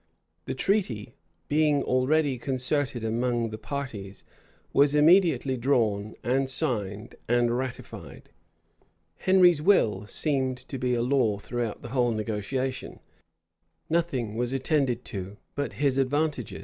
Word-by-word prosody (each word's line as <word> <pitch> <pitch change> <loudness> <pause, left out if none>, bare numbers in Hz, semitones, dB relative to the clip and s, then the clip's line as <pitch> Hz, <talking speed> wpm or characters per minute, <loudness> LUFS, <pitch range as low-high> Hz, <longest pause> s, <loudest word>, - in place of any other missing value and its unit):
The - - -4
treaty, 130 - -1 0.3
being 150 -1 +2
already 135 +1 +1
concerted 130 -1 -1
among 115 0 0
the 110 - -5
parties, 110 -10 -6 0.5
was 145 +1 +4
immediately 150 -4 +4
drawn, 110 -5 0
and 130 +2 +1
signed, 110 -7 -1
and 120 0 +2
ratified: 130 -1 -7 0.9
Henry's 180 -4 +4
will 110 - +3
seemed 130 -1 -1
to 135 - -5
be 125 0 +1
a 120 - 0
law 125 -5 +2
throughout 115 +1 -4
the 120 - -7
whole 125 -1 +2
negotiation: 110 +5 -3 0.9
nothing 160 -10 0
was 120 +2 -1
attended 135 -3 0
to 100 0 -6 0.2
but 145 0 -3
his 140 -2 +1
advantages. 140 -3 -1
130 Hz, 120 wpm, -27 LUFS, 115-145 Hz, 0.9 s, was